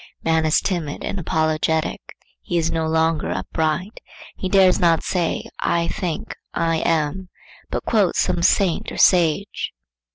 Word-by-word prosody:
Man 160 -1 +2
is 155 - +3
timid 170 -6 -3
and 195 - -3
apologetic; 155 -1 0 0.4
he 175 - -2
is 165 -1 +1
no 160 -1 -1
longer 160 0 +1
upright; 160 +6 -2 0.4
he 185 - -4
dares 190 -1 +5
not 165 -2 +3
say 175 -3 -1
'I 170 0 0
think,' 185 +6 -4 0.2
'I 165 -1 +1
am,' 165 +3 -1 0.4
but - - -3
quotes 205 -6 +2
some 180 -2 +1
saint 180 0 +2
or - - -7
sage. 175 +2 +2
165 Hz, 140 wpm, -21 LUFS, 160-185 Hz, 0.4 s, dares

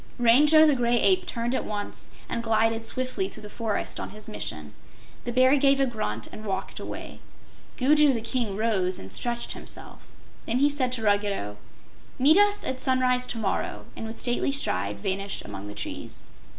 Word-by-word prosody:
Rango 295 +7 +6
the 300 - +5
Gray 240 -2 +2
Ape 370 -1 +3
turned 235 +1 -2
at - - 0
once 205 -1 -5 0.2
and 235 - -2
glided 225 0 +1
swiftly 255 +11 -1
through 215 - -11
the 210 - -9
forest 225 -3 -3
on - - -5
his 215 +1 -10
mission. 75 - -6 0.5
The 240 - -2
Bear 255 +3 +5
gave 275 0 +4
a 270 - +4
grunt 115 - -3
and 215 - -9
walked 195 -2 -4
away. - - -7 0.6
Gugu 295 +2 +5
the 235 -4 -1
King 225 -3 -2
rose 195 -5 +1
and 95 - -8
stretched 240 0 -2
himself. - - -10 0.4
Then 230 - +1
he 285 +2 +4
said 260 -3 0
to 230 -3 -2
Ruggedo: 200 - 0 0.6
"Meet 295 +7 +6
us 410 0 +3
at 260 - -3
sunrise 255 -1 +1
to - - -3
morrow," 210 -4 -2
and 225 - -6
with 225 - -7
stately 245 +2 +1
stride 100 - 0
vanished 195 - -3
among 100 +1 -7
the 105 - -8
trees. - - -6
235 Hz, 180 wpm, -26 LUFS, 205-260 Hz, 0.6 s, Rango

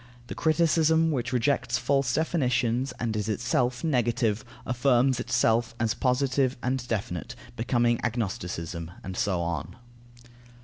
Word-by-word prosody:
The - - -3
criticism 160 0 +3
which 120 -4 -2
rejects 125 -1 +1
false 135 +2 +1
definitions, 125 -5 +1
and 115 -2 -1
is 105 0 -2
itself 120 +4 0
negative, 120 -6 +1 0.2
affirms 125 0 +2
itself 115 -1 +1
as 115 -1 +1
positive 130 +1 +1
and 125 0 -1
definite, 95 -7 -3 0.2
becoming 120 0 +1
agnosticism; 90 -7 -3
and 95 -1 -6
so 95 -2 0
on. 85 0 -3
120 Hz, 120 wpm, -27 LUFS, 110-130 Hz, 0.2 s, criticism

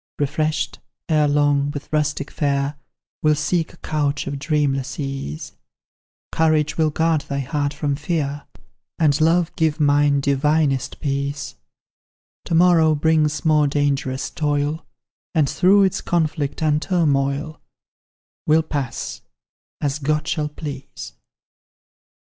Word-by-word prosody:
Refreshed, 155 +2 -1 0.3
erelong, 145 -2 +2
with 145 -1 -6
rustic 150 -1 -1
fare, 140 -1 0 0.5
We'll 155 -1 +3
seek 155 +2 -1
a - - -18
couch 145 -2 -1
of 140 0 -4
dreamless 140 -2 -1
ease; 135 - -5 0.8
Courage 155 -2 +2
will 160 -1 +2
guard 160 0 +1
thy 140 - -2
heart 145 +1 -1
from 145 -1 -2
fear, 145 -1 -3 0.5
And 155 -2 +2
Love 165 +1 +2
give 160 -1 +1
mine 145 -1 +3
divinest 140 0 +1
peace: 140 0 -2 0.9
To 165 - -1
morrow 165 -2 +5
brings 155 0 +1
more 150 -2 +4
dangerous 140 -2 -1
toil, 145 +1 -1 0.5
And 155 -3 +3
through 195 +7 +4
its 190 - +1
conflict 155 -3 -1
and 150 -1 +2
turmoil 150 -3 0 0.9
We'll 160 +1 +4
pass, 145 -5 -4 0.6
as 145 0 -1
God 150 +1 -1
shall 150 -2 -1
please. 145 -3 -8
150 Hz, 115 wpm, -21 LUFS, 140-155 Hz, 0.9 s, morrow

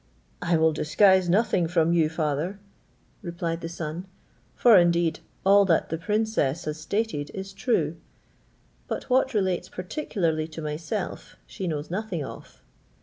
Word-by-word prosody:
"I 170 -1 +2
will 160 0 +3
disguise 185 +4 +4
nothing 185 -3 +2
from 165 0 +2
you, 160 -3 +3
father," 160 +3 -2 0.6
replied 170 -2 -3
the 165 - -5
son, 170 +2 -5 0.5
"for 235 -3 +6
indeed 170 -2 +3 0.3
all 200 +1 +7
that 170 -4 +2
the 165 - -2
princess 210 -6 0
has 150 0 -4
stated 200 -3 -2
is 195 0 -6
true; 190 - 0 0.9
but - - -5
what 260 -1 +3
relates 190 -4 0
particularly 180 - -2
to 160 0 -9
myself 165 +7 -4
she 190 - -6
knows 150 -1 -3
nothing 185 -6 -3
of. - - -11
170 Hz, 140 wpm, -26 LUFS, 160-195 Hz, 0.9 s, all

